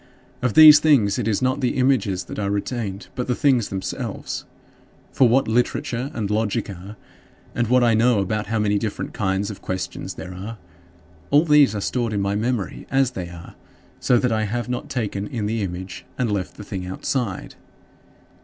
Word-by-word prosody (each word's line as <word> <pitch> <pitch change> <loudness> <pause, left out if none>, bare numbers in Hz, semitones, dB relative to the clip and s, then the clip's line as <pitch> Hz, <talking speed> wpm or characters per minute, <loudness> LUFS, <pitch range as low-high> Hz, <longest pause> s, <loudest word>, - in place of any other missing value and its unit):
Of 125 -4 0
these 155 -1 +10
things 125 -11 +3
it - - -1
is 110 +3 0
not 130 +1 +1
the 125 - 0
images 125 -8 +1
that 90 - -7
are 100 -1 -1
retained, 100 0 -3
but 125 - -4
the 125 - 0
things 130 -6 +2
themselves. 95 -1 -4 0.7
For 125 - +4
what 135 +3 +3
literature 120 +2 0
and 110 -3 -2
logic 105 0 -1
are, 95 +3 -10 0.6
and 120 -1 0
what 125 +1 +4
I 120 -1 +4
know 115 +1 +3
about 105 +2 -1
how 110 +1 -1
many 105 -1 +1
different 110 -2 -4
kinds 95 0 -1
of 100 - -10
questions 95 0 -5
there 95 0 -8
are 105 +5 -7 0.7
all 145 +3 +4
these 150 -8 +5
are 100 - -2
stored 120 +1 -1
in 100 - 0
my 100 0 0
memory 110 0 -2
as 135 -1 +2
they 90 -7 -6
are, 85 -1 -11 0.5
so 125 - +3
that 125 0 +1
I 110 -1 +1
have 120 +4 -3
not 125 0 -4
taken 105 -5 -3
in 115 -5 -3
the 110 +1 -1
image 95 0 -5
and 120 -4 0
left 95 -3 -3
the - - -8
thing 95 -2 -5
outside. 95 +3 -3
110 Hz, 190 wpm, -22 LUFS, 100-125 Hz, 0.7 s, these